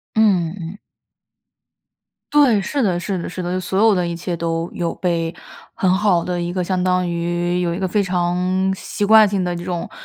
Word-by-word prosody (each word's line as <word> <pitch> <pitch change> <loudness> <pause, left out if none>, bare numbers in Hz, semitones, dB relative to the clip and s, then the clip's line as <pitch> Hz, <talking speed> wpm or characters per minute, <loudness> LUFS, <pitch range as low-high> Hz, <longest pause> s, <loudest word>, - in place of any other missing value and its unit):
嗯 195 -7 +3
嗯 175 - -8
嗯。 170 +4 -7 1.6
对， 275 -8 +5
是 275 +8 -2
的 180 -5 +1
是 190 +1 -3
的 170 - -5
是 185 - -6
的， 180 +1 -2
所 190 +2 -2
有 220 -2 +5
的 180 - 0
一 170 - -3
切 175 +1 -4
都 165 0 -2
有 170 -1 -2
被 170 -2 -1 0.4
很 185 - 0
好 190 -4 +2
的 180 -1 -2
一 175 0 -3
个 180 0 -1
相 185 0 -1
当 180 -1 +1
于 175 +1 -1
有 170 -1 0
一 180 - -4
个 190 - 0
非 200 +3 +1
常 180 +1 0
习 205 +2 -3
惯 215 0 +7
性 195 -2 -1
的 175 -1 -2
这 170 - -6
种， 175 -1 -4
180 Hz, 220 characters per minute, -20 LUFS, 175-190 Hz, 1.6 s, 惯